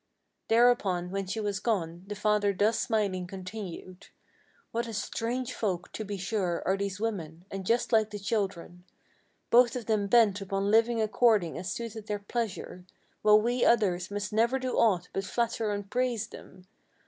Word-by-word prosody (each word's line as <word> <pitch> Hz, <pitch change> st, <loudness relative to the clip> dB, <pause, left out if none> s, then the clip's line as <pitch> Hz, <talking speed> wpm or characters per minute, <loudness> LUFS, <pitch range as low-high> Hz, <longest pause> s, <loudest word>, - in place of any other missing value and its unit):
Thereupon 220 Hz, -7 st, +3 dB
when 195 Hz, -1 st, -3 dB
she 210 Hz, +4 st, -3 dB
was 205 Hz, -2 st, -2 dB
gone, 175 Hz, -6 st, -2 dB
the 210 Hz, -, -5 dB
father 210 Hz, -1 st, +2 dB
thus 215 Hz, +3 st, +2 dB
smiling 200 Hz, -6 st, 0 dB
continued: 185 Hz, -1 st, -8 dB, 0.6 s
"What 235 Hz, +1 st, -2 dB
a 225 Hz, -, -5 dB
strange 235 Hz, +5 st, -2 dB
folk, 185 Hz, -5 st, -2 dB
to 220 Hz, -, -5 dB
be 205 Hz, -1 st, -5 dB
sure, 185 Hz, -3 st, -1 dB
are 190 Hz, -, +2 dB
these 200 Hz, -1 st, -3 dB
women; 175 Hz, -7 st, -4 dB
and 195 Hz, -1 st, -5 dB
just 235 Hz, +1 st, +1 dB
like 220 Hz, -1 st, +4 dB
the 210 Hz, -, -6 dB
children; 195 Hz, -4 st, -3 dB, 0.7 s
Both 240 Hz, 0 st, +6 dB
of 245 Hz, -3 st, -4 dB
them 210 Hz, -2 st, +1 dB
bent 210 Hz, -3 st, +4 dB
upon 195 Hz, +1 st, -1 dB
living 230 Hz, +1 st, +4 dB
according 215 Hz, -4 st, +3 dB
as 185 Hz, -, -4 dB
suiteth 225 Hz, -2 st, -6 dB
their 210 Hz, -, -1 dB
pleasure, 205 Hz, -3 st, -4 dB, 0.4 s
While 210 Hz, 0 st, +6 dB
we 240 Hz, +1 st, +1 dB
others 190 Hz, -6 st, +2 dB
must 205 Hz, 0 st, -4 dB
never 235 Hz, +4 st, +3 dB
do 255 Hz, -1 st, -3 dB
aught 185 Hz, -6 st, +3 dB
but 195 Hz, -, -1 dB
flatter 230 Hz, +1 st, -1 dB
and 205 Hz, -1 st, -4 dB
praise 245 Hz, -1 st, 0 dB
them. 185 Hz, -, -13 dB
205 Hz, 170 wpm, -29 LUFS, 190-230 Hz, 0.7 s, Both